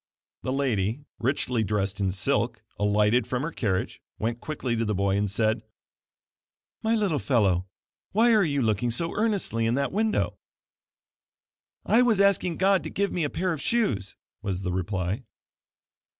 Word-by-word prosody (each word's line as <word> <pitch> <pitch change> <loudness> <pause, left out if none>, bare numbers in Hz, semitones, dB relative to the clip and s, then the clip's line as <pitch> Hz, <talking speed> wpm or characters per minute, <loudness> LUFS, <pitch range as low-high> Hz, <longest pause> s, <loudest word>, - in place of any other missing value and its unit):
The 130 - -2
lady 130 -1 0
richly 125 -2 +1
dressed 100 -1 -1
in 95 -2 +1
silk, 115 +3 0 0.2
alighted 105 +3 +3
from 125 +1 -1
her 165 - -2
carriage, 100 - -2 0.2
went 115 +2 -2
quickly 135 -6 -2
to 115 - 0
the 105 -2 -1
boy, 100 0 +1
and 100 0 0
said: 110 +2 +1 1.2
"My 225 +1 +2
little 195 -9 +1
fellow 95 -8 +2 0.4
why 230 +3 +4
are 215 -2 +5
you 140 -5 0
looking 110 +2 +1
so 165 +8 -1
earnestly 200 - 0
in 115 - +1
that 140 0 0
window?" 215 +2 0 1.5
"I 230 - +5
was 230 -5 +3
asking 195 -4 +3
God 195 0 +3
to - - -3
give 200 -1 -1
me 175 - -1
a 145 - 0
pair 185 +3 -1
of 155 - -5
shoes," 120 - 0 0.3
was 95 -3 -3
the 90 -2 -2
reply. 95 +3 -2
120 Hz, 160 wpm, -26 LUFS, 105-175 Hz, 1.5 s, are